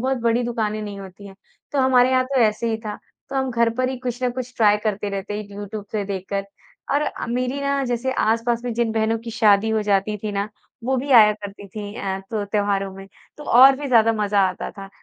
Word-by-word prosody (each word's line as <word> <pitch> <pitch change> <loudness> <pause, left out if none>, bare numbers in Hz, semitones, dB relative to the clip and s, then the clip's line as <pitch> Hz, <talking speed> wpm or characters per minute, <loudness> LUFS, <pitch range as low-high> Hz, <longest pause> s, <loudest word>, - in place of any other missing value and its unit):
बहुत 260 +1 0
बड़ी 235 +1 +2
दुकानें 215 -3 -2
नहीं 205 -1 -6
होती 195 +1 -11
हैं 195 - -12 0.4
तो 285 - 0
हमारे 255 -1 +4
यहाँ 255 0 +3
तो 265 0 0
ऐसे 225 +1 +2
ही 220 - 0
था। 210 - -5 0.3
तो 270 - -4
हम 265 -1 0
घर 235 -1 +2
पर 255 +1 0
ही 260 - -3
कुछ 250 0 -5
ना 250 - +2
कुछ 255 0 -6
ट्राय 210 -2 +5
करते 210 -1 -1
रहते 200 +1 -4
यूट्यूब 205 +1 -6
से 210 -2 -1
देखकर 195 0 -3 0.5
और 285 - +3
अ, - - -4
मेरी 250 +3 -1
ना 280 0 0
जैसे 245 +1 -1
आस-पास 230 +1 +1
में 245 - -2
जिन 235 -1 0
बहनों 225 0 +1
की 230 - -5
शादी 220 -2 +3
हो 220 -1 +1
जाती 205 0 +1
थी 210 +1 -4
ना, 200 +1 -2 0.4
वो 265 +2 +1
भी 275 +3 -3
आया 220 -4 +8
करती 205 -1 -9
थी 205 +1 -7
अ, 195 -4 -3
तो 215 -2 -2
त्योहारों 200 -1 -1
में, 195 0 -10 0.3
तो 295 - -10
और 265 +2 +7
भी 285 +1 -5
ज़्यादा 225 -2 +5
मज़ा 210 -2 +1
आता 185 - -5
था। 195 -1 -10
220 Hz, 230 wpm, -22 LUFS, 205-250 Hz, 0.5 s, आया